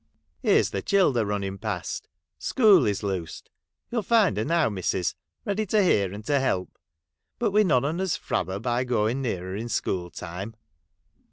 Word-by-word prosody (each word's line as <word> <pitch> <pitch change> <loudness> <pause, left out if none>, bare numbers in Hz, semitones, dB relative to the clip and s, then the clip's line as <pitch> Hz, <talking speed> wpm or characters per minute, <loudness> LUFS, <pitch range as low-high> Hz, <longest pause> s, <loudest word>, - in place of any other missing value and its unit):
Here's - - +3
the 100 - -2
childer 135 - +2
running 100 -1 -3
past! 105 -6 -4 0.3
School 205 - +5
is 105 +1 -1
loosed. 95 -5 -4 0.4
You 240 - -2
'11 205 - -7
find 220 - +4
her 110 - 0
now, 165 +1 +2
missus, 95 -3 -1 0.3
ready 205 +1 -1
to 210 +1 +3
hear 100 - +2
and 105 +2 -8
to 145 -1 +2
help. 95 -9 -1 0.6
But 235 -3 0
we 210 +2 +4
none 140 -9 +2
on 165 +5 -1
us 190 -3 0
frab 90 - -2
her 95 +1 -3
by 120 +2 0
going 120 +1 0
near 110 -9 -2
her 95 - -4
in 115 +3 -4
school 90 -5 -1
time.' 90 +6 -7
115 Hz, 180 wpm, -26 LUFS, -, 0.6 s, School